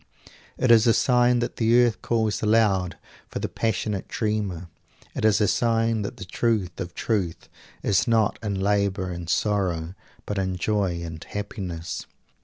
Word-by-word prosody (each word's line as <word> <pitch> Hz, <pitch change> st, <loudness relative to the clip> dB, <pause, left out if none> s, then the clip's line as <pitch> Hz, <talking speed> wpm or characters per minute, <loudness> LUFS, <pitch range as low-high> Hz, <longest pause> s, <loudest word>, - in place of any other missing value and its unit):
It 130 Hz, -, +3 dB
is 115 Hz, 0 st, +6 dB
a 115 Hz, -, +5 dB
sign 125 Hz, -1 st, +3 dB
that 120 Hz, -, -3 dB
the 115 Hz, +1 st, +4 dB
earth 120 Hz, -2 st, +2 dB
calls 110 Hz, -3 st, 0 dB
aloud 105 Hz, -5 st, +2 dB, 0.3 s
for -, -, -5 dB
the -, -, -2 dB
passionate 105 Hz, -2 st, -2 dB
dreamer. 105 Hz, -6 st, -2 dB, 0.5 s
It -, -, -4 dB
is 110 Hz, -1 st, +4 dB
a 105 Hz, -, +3 dB
sign 115 Hz, -1 st, +1 dB
that 100 Hz, -, -5 dB
the -, -, -7 dB
truth 100 Hz, -2 st, -1 dB
of 85 Hz, -1 st, -5 dB
truth 95 Hz, -7 st, -2 dB, 0.4 s
is 95 Hz, -2 st, +2 dB
not 115 Hz, -3 st, +2 dB
in 100 Hz, -3 st, -2 dB
labor 100 Hz, -1 st, 0 dB
and 85 Hz, -1 st, -6 dB
sorrow, 90 Hz, -4 st, 0 dB, 0.3 s
but 105 Hz, -1 st, -2 dB
in 95 Hz, -1 st, -1 dB
joy 90 Hz, -2 st, -1 dB
and 80 Hz, -1 st, -7 dB
happiness. 95 Hz, -5 st, -5 dB
105 Hz, 160 wpm, -25 LUFS, 90-115 Hz, 0.5 s, is